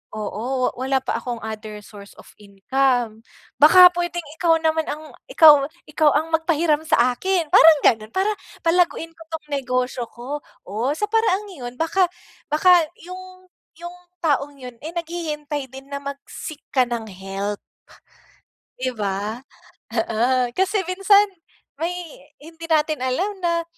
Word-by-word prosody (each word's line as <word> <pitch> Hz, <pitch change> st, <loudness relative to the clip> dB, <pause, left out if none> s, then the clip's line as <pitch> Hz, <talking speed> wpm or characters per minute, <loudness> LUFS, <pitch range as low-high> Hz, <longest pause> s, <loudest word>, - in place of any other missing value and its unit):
oo 240 Hz, +5 st, -2 dB
wala 265 Hz, +2 st, 0 dB
pa -, -, -2 dB
akong 240 Hz, -2 st, -5 dB
other 215 Hz, -1 st, -7 dB
source 200 Hz, -1 st, -13 dB
of -, -, -15 dB
income 225 Hz, +3 st, -1 dB, 0.4 s
baka 360 Hz, +5 st, +10 dB
puwedeng 345 Hz, 0 st, -2 dB
ikaw 335 Hz, -2 st, +3 dB
naman 320 Hz, 0 st, +1 dB
ang 310 Hz, +1 st, -8 dB, 0.2 s
ika 325 Hz, -9 st, +7 dB, 0.4 s
ikaw 305 Hz, 0 st, +3 dB
ang 315 Hz, +2 st, 0 dB
mag 320 Hz, -, -2 dB
pahiram 315 Hz, -2 st, +2 dB
sa 250 Hz, -1 st, +3 dB
akin," 370 Hz, +2 st, 0 dB
parang 320 Hz, -2 st, +8 dB
ganon. 215 Hz, -1 st, +3 dB
"Para 395 Hz, +3 st, +1 dB, 0.3 s
palaguin 330 Hz, -1 st, +1 dB
ko 330 Hz, -, -19 dB
tong 315 Hz, -2 st, -6 dB
negosyo 255 Hz, -2 st, -1 dB
ko." 255 Hz, +6 st, -6 dB, 0.3 s
Oh, 225 Hz, +7 st, -1 dB
sa 420 Hz, -, -1 dB
paraang 440 Hz, -3 st, +1 dB
'yon 250 Hz, -8 st, -8 dB
baka 360 Hz, +3 st, +2 dB, 0.4 s
baka 350 Hz, +3 st, +5 dB, 0.2 s
yung 370 Hz, 0 st, -11 dB, 0.3 s
yung 345 Hz, +1 st, -8 dB, 0.3 s
taong 290 Hz, -2 st, 0 dB
yon, 250 Hz, -2 st, -9 dB
eh, 315 Hz, -, -5 dB
naghihintay 300 Hz, -5 st, -4 dB
din 270 Hz, +1 st, -11 dB
na 280 Hz, -, -3 dB
mag 280 Hz, 0 st, -5 dB
seek 310 Hz, -2 st, -8 dB, 0.2 s
ka 260 Hz, -, +5 dB
ng 235 Hz, -2 st, -4 dB
help. 195 Hz, +2 st, -5 dB, 1.2 s
Di 255 Hz, -, 0 dB
ba? 205 Hz, +1 st, -2 dB, 0.6 s
Oo, 240 Hz, +2 st, +1 dB
kasi 385 Hz, +1 st, +1 dB
minsan 395 Hz, +2 st, +4 dB, 0.5 s
may 335 Hz, +2 st, -1 dB, 0.5 s
hindi 325 Hz, +2 st, -11 dB
natin 310 Hz, -2 st, +1 dB
alam 330 Hz, +11 st, 0 dB
na, 340 Hz, -2 st, 0 dB
295 Hz, 145 wpm, -22 LUFS, 245-340 Hz, 1.2 s, baka